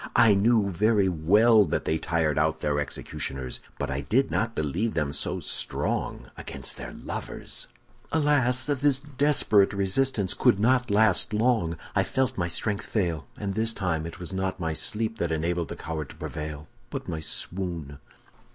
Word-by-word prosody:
I 110 -3 +7
knew 105 +1 +3
very 100 +2 +2
well 105 +7 +5
that 75 - -2
they 80 - 0
tired 80 -2 0
out 80 +1 +1
their 75 -1 0
executioners, 65 -2 -3 0.2
but - - -3
I 70 +1 -2
did 130 - +1
not 115 +1 0
believe 85 +10 -1
them 75 -3 0
so - - -1
strong - - -2
against - - -4
their - - -7
lovers!' - - -5 0.4
"Alas! 145 -5 +2
this 145 -1 +2
desperate 140 -8 +2
resistance 100 +1 +1
could 100 - +3
not 125 +3 +3
last 105 0 +3
long. 105 -7 +1 0.2
I 95 - +4
felt 130 +6 0
my 90 -2 -1
strength 100 +4 -1
fail, 85 -7 -1
and 100 -2 -3
this 110 +2 0
time 80 -5 -1
it 85 - -9
was 90 +1 -6
not 95 0 -2
my 80 -2 -1
sleep 110 +7 -1
that 85 -1 0
enabled 85 +2 -1
the - - -6
coward 80 -3 -5
to - - -11
prevail, 75 -1 -6 0.2
but - - -5
my 80 -2 -3
swoon." 85 -3 -3
95 Hz, 165 wpm, -27 LUFS, 80-115 Hz, 0.4 s, I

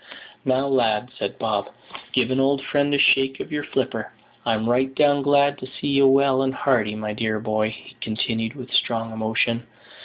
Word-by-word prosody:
"Now, 130 +1 +2
lad," 125 -3 +1
said - - -3
Bob, - - -2 0.4
"give 130 -1 +1
an 130 - +1
old 135 0 +2
friend 145 +1 +1
a 145 - +3
shake 135 -1 +4
of - - -7
your 150 -1 -2
flipper. - - -3 0.4
I'm 110 -1 +1
right 130 +2 +1
down 145 -1 +3
glad 145 0 +3
to 130 - -8
see 130 - -5
ye 140 0 +3
well 135 0 +4
and 135 0 -1
hearty, 110 -6 +1
my 105 0 -4
dear 110 0 -2
boy," 110 0 0
he 110 +3 -12
continued, 115 +1 -2
with 125 -3 -10
strong 115 -1 0
emotion. 115 +2 -1
130 Hz, 185 wpm, -23 LUFS, 110-140 Hz, 0.4 s, shake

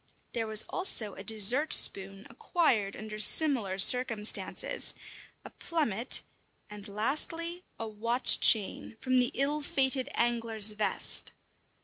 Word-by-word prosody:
There 230 -2 -4
was 215 0 +4
also 230 - -2
a 195 - -12
dessert 225 +8 +2
spoon 195 +1 +3
acquired 235 - -3
under 215 0 -10
similar 215 -4 +1
circumstances, 225 0 0 0.5
a - - -12
plummet, 265 - -2 0.5
and, 210 0 -10
lastly, 320 - -1 0.2
a 225 - -7
watch 230 +4 +3
chain, 220 +1 0
from 255 -1 -1
the 245 - 0
ill 290 +3 -2
fated 270 -3 -2
angler's 230 -3 +1
vest. 210 0 -4
230 Hz, 115 wpm, -27 LUFS, 210-270 Hz, 0.5 s, was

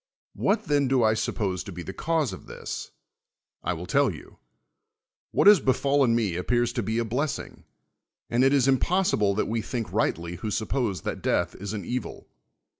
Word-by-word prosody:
Wliat 210 - +1
then 145 -2 +2
do 130 -2 +3
I 110 0 +4
suppose 100 -4 -2
to - - -8
be 90 -1 -7
the 95 - -7
cause 165 +5 0
of - - -10
this? 475 -1 -6 0.7
I - - 0
will - - -6
tell - - +3
yon: - - -12 0.9
what - - +1
has 205 -2 +9
befallen 135 -2 +2
n^c 100 -7 -1
appears 120 +5 +1
to 120 - -1
be 110 +2 -2
a 120 - +1
blessing; 130 +6 -3 0.6
and 120 +2 +2
it 135 - +5
is 135 -2 +3
impossible 135 - +2
that 110 - +1
we 115 0 -1
think 115 0 -4
rightly 85 +1 -1
who 105 +5 -4
suppose 110 - -1
that - - -4
death - - +1
is 100 +2 -6
an 105 - -5
evil. 125 -2 -5
120 Hz, 185 wpm, -26 LUFS, 105-140 Hz, 0.9 s, has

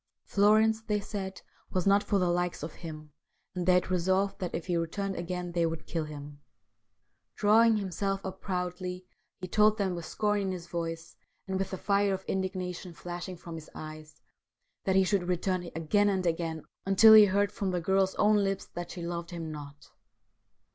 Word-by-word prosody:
Florence, 215 +2 +4
they 210 -2 -1
said, 195 -2 -6 0.3
was 185 -2 -1
not 200 +1 +5
for 205 - 0
the 180 -2 +2
likes 175 -2 -1
of 155 - -5
him, 155 -3 -9 0.4
and 180 -1 -3
they 180 - +6
had 180 +1 +1
resolved 190 +2 +1
that 180 -2 -3
if 165 - -4
he 175 - -1
returned 190 +4 -2
again 175 0 -4
they 170 0 +1
would 165 -1 -2
kill 165 -2 -2
him. 145 -1 -9 1.0
Drawing 220 +2 +5
himself 195 0 -2
up 190 0 -6
proudly 180 -1 -3 0.4
he 185 - -4
told 215 +3 +4
them 195 -3 0
with 170 -2 -5
scorn 210 -1 0
in 190 -1 -1
his 175 -2 -6
voice, 165 -1 -5 0.3
and 190 0 -1
with 195 0 -1
the 190 - -4
fire 200 0 +2
of 190 - -9
indignation 185 -2 -3
flashing 175 +2 -6
from 170 0 -9
his 160 -1 -8
eyes, 155 0 -9 0.7
that 190 - +2
he 190 - +6
should 190 -2 0
return 180 0 -1
again 205 +6 +2
and 190 -2 0
again 165 -2 -1 0.2
until 195 +3 +7
he 215 -1 +10
heard 200 +1 +1
from 200 -2 -2
the 180 -1 0
girl's 190 +2 +1
own 210 0 +4
lips 195 -1 -1
that 175 0 -5
she 175 - -7
loved 170 0 -4
him 165 -3 -5
not. 145 -1 -10
185 Hz, 190 wpm, -29 LUFS, 170-195 Hz, 1.0 s, he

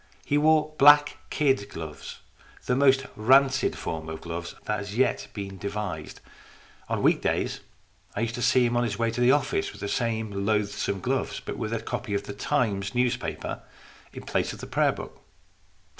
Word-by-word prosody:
He 145 - 0
wore 155 +1 +3
black 145 +1 +7
kid 135 -8 +1
gloves, 80 -2 -8 0.4
the 125 - +1
most 135 0 +4
rancid 135 +4 +4
form 80 -1 -5
of 80 0 -5
gloves 85 0 -6
that 105 - -1
has 100 +2 -6
yet 130 - +1
been 100 -2 -6
devised. 100 0 -5 0.7
On - - -1
week - - +4
days - - -1 0.6
I 100 - -1
used 115 0 -1
to 120 - -4
see 125 +1 +4
him 120 0 0
on 120 - +2
his 110 -4 -2
way 115 -1 +1
to 120 +2 -3
the 125 +1 +6
office 135 - +1
with 100 - -13
the 100 - -2
same 110 -1 -1 0.2
loathsome 100 -2 0
gloves, 130 +6 -1
but - - -6
with 110 -2 -4
a 115 - -1
copy 115 -1 -4
of 100 - -1
the 100 - -7
Times 100 -5 -1
newspaper 125 -1 -1 0.5
in - - -9
place - - -1
of - - -10
the - - -7
prayer - - +2
book. - - -9
115 Hz, 185 wpm, -26 LUFS, 100-130 Hz, 0.7 s, black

